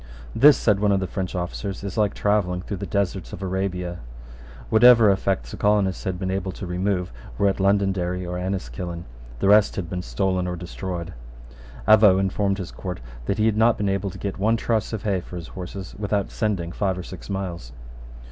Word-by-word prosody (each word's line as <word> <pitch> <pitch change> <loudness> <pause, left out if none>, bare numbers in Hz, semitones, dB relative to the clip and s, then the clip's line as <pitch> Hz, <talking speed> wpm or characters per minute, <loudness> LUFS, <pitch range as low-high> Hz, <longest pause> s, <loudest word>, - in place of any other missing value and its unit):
"This," 145 +2 +7
said 105 -3 +2
one 105 0 +2
of 100 - +3
the 95 - -1
French 95 0 -4
officers, 95 +2 -4
"is 100 -2 -5
like 105 -3 +1
travelling 90 -4 +1
through 100 - -5
the 100 +2 -5
deserts 100 -2 -2
of 95 - -6
Arabia." 90 -2 -2 0.7
Whatever 115 -2 +7
effects 95 -10 -1
the - - -7
colonists 105 -2 +1
had 95 -2 -1
been 95 0 -2
able 95 0 -2
to 95 - -7
remove 90 -1 -1 0.3
were 100 - +3
at 95 - 0
Londonderry 95 -2 +1
or 90 0 -4
Enniskillen. 85 -2 -4 0.3
The - - 0
rest 105 0 +5
had 85 -4 -4
been 90 -1 -2
stolen 90 +8 -1
or 90 - -2
destroyed. 90 0 -5 0.7
Avaux 105 -3 +7
informed 95 0 0
his 95 -2 -6
court 90 -2 -6 0.3
that - - 0
he 110 - +2
had 110 -1 +2
not 115 +1 +4
been 100 -1 0
able 100 0 -1
to - - -9
get 100 -1 -4
one 110 +3 +2
truss 115 -3 -1
of 110 -2 -4
hay 100 -4 0
for 90 - -10
his 85 -2 -7
horses 95 +1 -7
without 100 -1 -1
sending 95 -6 -1
five 95 0 -1
or 90 - -5
six 95 +2 -10
miles. 90 -10 -4
95 Hz, 200 wpm, -24 LUFS, 90-100 Hz, 0.7 s, This